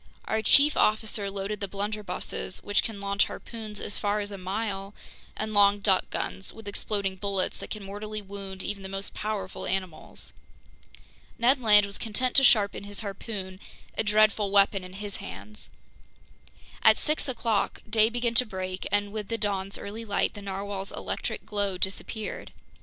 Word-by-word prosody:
Our 220 0 0
chief 285 +6 +6
officer 210 -1 +2
loaded 200 +1 -3
the 200 - -2
blunderbusses, 205 -1 -3
which 205 -1 +3
can 220 -3 -5
launch 200 0 +2
harpoons 215 -3 -7
as 205 - -4
far 205 +1 +1
as 205 0 -4
a 200 - -5
mile, 195 +1 -3 0.4
and 215 0 -2
long 205 0 +6
duck 195 -2 +2
guns 195 - -3
with 225 -2 -12
exploding 200 -1 -1
bullets 195 -1 -1
that - - -7
can 215 -2 -5
mortally 210 +2 -5
wound 195 -1 -7
even 205 -1 -3
the 190 - -6
most 195 +1 -5
powerful 205 -3 -3
animals. 185 -4 -4 1.0
Ned 255 +3 +4
Land 210 -3 +7
was 200 0 -7
content 245 +3 0
to 270 - +8
sharpen 205 -5 +4
his 205 +1 -6
harpoon, 195 -2 -5 0.4
a - - +1
dreadful 210 -1 +4
weapon 200 -1 +5
in 185 0 -9
his 205 0 -5
hands. 210 +2 -8 1.1
At - - +7
six 305 -2 0
o'clock 230 -4 0
day 220 0 +4
began 240 0 0
to 250 +2 +6
break, 185 -2 -4
and 205 0 +1
with 210 -1 -4
the 230 - -1
dawn's 200 -2 -1
early 215 +3 -6
light, 205 -3 +1
the 205 - -8
narwhale's 195 0 -4
electric - - -4
glow 200 -3 -1
disappeared. 200 +3 -3
205 Hz, 165 wpm, -28 LUFS, 195-215 Hz, 1.1 s, to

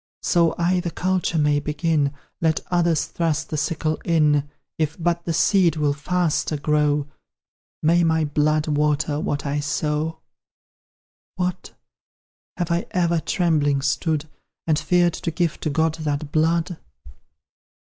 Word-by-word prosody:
So 170 -2 +3
I 180 +2 +2
the 175 -1 -3
culture 180 -1 -1
may 150 -1 +3
begin, 150 -1 0 0.3
Let 160 -1 +2
others 170 -3 +2
thrust 160 -2 -2
the - - -1
sickle 155 +1 -1
in; 150 -3 +2 0.3
If 155 -1 -1
but 170 0 0
the 170 - -1
seed 175 +1 +3
will 150 -2 +1
faster 160 0 -1
grow, 150 0 +1 0.8
May 170 +2 +4
my 160 -1 +2
blood 150 +1 +1
water 150 0 +1
what 145 -1 -2
I 145 +1 -1
sow! 150 +2 -1 1.2
What! 180 0 -3 0.8
have 175 -1 -2
I 170 +1 0
ever 170 -2 +1
trembling 150 -5 +1
stood, 150 +2 0 0.4
And 155 -2 +2
feared 175 0 +2
to - - -3
give 165 0 -1
to 155 - -2
God 160 +2 +1
that 150 -2 -3
blood? 165 +2 +1
160 Hz, 135 wpm, -23 LUFS, 150-170 Hz, 1.2 s, May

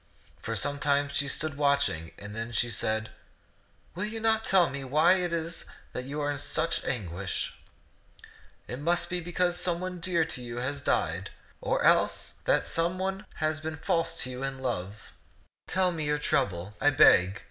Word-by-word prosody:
For 115 - -3
some 145 +6 +1
time 140 0 +2
she 140 0 0
stood 145 +1 0
watching, 140 - +1
then 115 +3 -6
she 120 0 +1
said, 110 -1 -1 0.8
"Will 185 +5 -2
you 220 +1 -4
not 220 0 +2
tell 185 -5 +4
me 140 +1 -5
w^hy 155 +8 +4
it 175 - -1
is 165 0 -2 0.3
that 125 - -4
you 145 +3 -5
are 145 0 0
in 145 - -3
such 165 +4 0
anguish? 95 -5 -3 1.1
It 125 - -5
must 170 +3 +1
be 180 - +1
because 175 +1 0
some 175 -2 0
one 185 0 -5
dear 170 -1 +1
to 125 - -3
you 120 -1 -6
has 140 +3 -2
died, 85 -4 0 0.3
or - - 0
else - - +3
that - - +3
some 170 +2 0
one 190 +2 -3
has 155 0 -1
been 155 0 -5
false 165 +2 0
to 130 - -2
you 125 +1 -6
in 135 0 -3
love. 105 -4 -4 0.6
Tell 185 -1 +2
me 160 -3 -3
your 150 0 +1
trouble, 105 - -1
I 145 - +5
beg. 100 -9 +5
145 Hz, 180 wpm, -28 LUFS, 120-170 Hz, 1.1 s, I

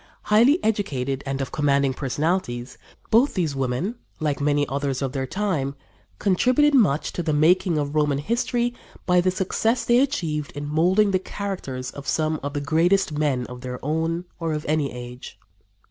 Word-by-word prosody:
Highly 235 +9 +5
educated 140 -11 -1
and 135 0 -2
of 135 - -4
commanding 140 -2 +2
personalities, 135 -2 -2 0.3
both 240 +6 +4
these 165 -7 0
women, 135 - -2 0.2
like 145 -3 -1
many 145 0 +2
others 140 -1 -2
of 135 - -1
their 135 -1 -3
time, 160 -7 -1 0.4
contributed 255 +10 +3
much 175 - +3
to - - -2
the 160 -2 -1
making 170 +3 +3
of 145 -1 -2
Roman 150 -2 +2
history 235 - 0 0.3
by 180 -1 +4
the 185 - +2
success 200 +6 0
they 240 +1 +4
achieved 160 - -1
in 145 0 -5
molding 180 +7 +3
the 185 - +2
characters 180 -11 -5
of 140 -1 -10
some 155 -1 0
of 145 0 -4
the 145 - -2
greatest 170 +6 +2
men 145 -4 0
of 125 0 -9
their 125 -1 -5
own 165 +3 -1
or 165 -2 -1
of 150 0 -4
any 150 -2 +1
age. 125 0 -9
155 Hz, 170 wpm, -24 LUFS, 140-190 Hz, 0.4 s, Highly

